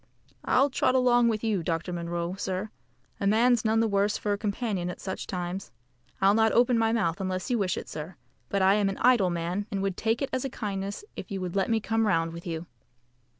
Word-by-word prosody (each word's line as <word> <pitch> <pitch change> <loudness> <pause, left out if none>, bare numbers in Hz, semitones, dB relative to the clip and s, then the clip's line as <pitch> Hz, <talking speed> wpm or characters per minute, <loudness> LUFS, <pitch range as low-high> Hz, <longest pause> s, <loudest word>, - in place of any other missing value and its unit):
"I'll 275 +2 +3
trot 255 - +2
along 245 -2 +4
with 220 -2 0
you, 215 -5 +1
Dr. 165 +2 -2
Munro, 170 0 -3
sir. 190 +2 -3 0.5
A 200 - 0
man's 230 +3 +4
none 220 0 +2
the 225 - +2
worse 200 0 +1
for 205 - -1
a - - -1
companion 205 -4 -2
at 180 - -6
such 190 - -5
times. 180 +1 -4 0.5
I'll 195 +1 +5
not 220 0 +4
open 245 +1 +4
my 225 -1 +2
mouth 195 -5 0
unless 185 +4 -2
you 240 - +2
wish 185 -3 0
it, - - -6
sir; 160 +4 -7 0.3
but 200 -1 +1
I 190 +1 +6
am 205 -1 +2
an 195 - -4
idle 240 -7 +4
man, 175 +4 -2
and 200 -3 -2
would 195 -2 -2
take 225 +3 0
it 275 - -3
as 260 - 0
a 270 - -2
kindness 200 - -4
if - - -7
you 195 -2 -3
would 180 0 -4
let 195 -1 +1
me 225 -1 +2
come 225 +1 0
round 165 -3 +1
with 170 +1 -8
you." 165 0 -4
200 Hz, 230 wpm, -27 LUFS, 185-225 Hz, 0.5 s, I